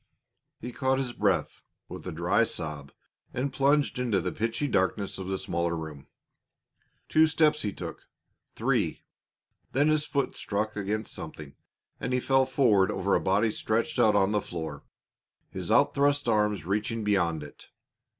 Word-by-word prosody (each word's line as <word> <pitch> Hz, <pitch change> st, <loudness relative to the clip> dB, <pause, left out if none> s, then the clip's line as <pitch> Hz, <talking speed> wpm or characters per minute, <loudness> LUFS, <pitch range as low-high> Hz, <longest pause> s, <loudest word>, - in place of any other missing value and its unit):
He 125 Hz, -, -6 dB
caught 130 Hz, +1 st, +1 dB
his 130 Hz, -2 st, -2 dB
breath 95 Hz, -9 st, 0 dB, 0.3 s
with -, -, -8 dB
a -, -, -3 dB
dry 85 Hz, +7 st, +2 dB
sob 75 Hz, -9 st, -4 dB, 0.4 s
and 135 Hz, +3 st, -1 dB
plunged 140 Hz, -1 st, +2 dB
into 115 Hz, -6 st, +1 dB
the 85 Hz, -, -2 dB
pitchy 115 Hz, +6 st, -1 dB
darkness 100 Hz, -3 st, 0 dB
of 95 Hz, -, -5 dB
the 95 Hz, 0 st, -1 dB
smaller 85 Hz, -1 st, -1 dB
room. 80 Hz, -4 st, -7 dB, 1.0 s
Two 160 Hz, 0 st, +5 dB
steps 155 Hz, -1 st, +3 dB
he 105 Hz, -, -1 dB
took -, -, -8 dB, 0.5 s
three. -, -, 0 dB, 0.7 s
Then 145 Hz, +4 st, +3 dB
his 155 Hz, 0 st, +2 dB
foot 140 Hz, -2 st, -1 dB
struck 105 Hz, +1 st, -2 dB
against 105 Hz, +1 st, -3 dB
something, 75 Hz, -2 st, -8 dB, 0.5 s
and 125 Hz, -, -2 dB
he 125 Hz, -, +2 dB
fell 135 Hz, +1 st, +3 dB
forward 105 Hz, -8 st, +3 dB
over 100 Hz, +1 st, 0 dB
a -, -, +3 dB
body 105 Hz, +4 st, +2 dB
stretched 115 Hz, +7 st, -1 dB
out 110 Hz, -3 st, +5 dB
on 100 Hz, 0 st, +3 dB
the 105 Hz, -1 st, +1 dB
floor, 80 Hz, -6 st, -6 dB, 0.7 s
his -, -, -4 dB
out -, -, +4 dB
thrust 145 Hz, -1 st, +2 dB
arms 105 Hz, -6 st, +1 dB
reaching 105 Hz, +3 st, -1 dB
beyond 85 Hz, -7 st, +1 dB
it. 75 Hz, -, -13 dB
105 Hz, 160 wpm, -28 LUFS, 95-130 Hz, 1.0 s, Two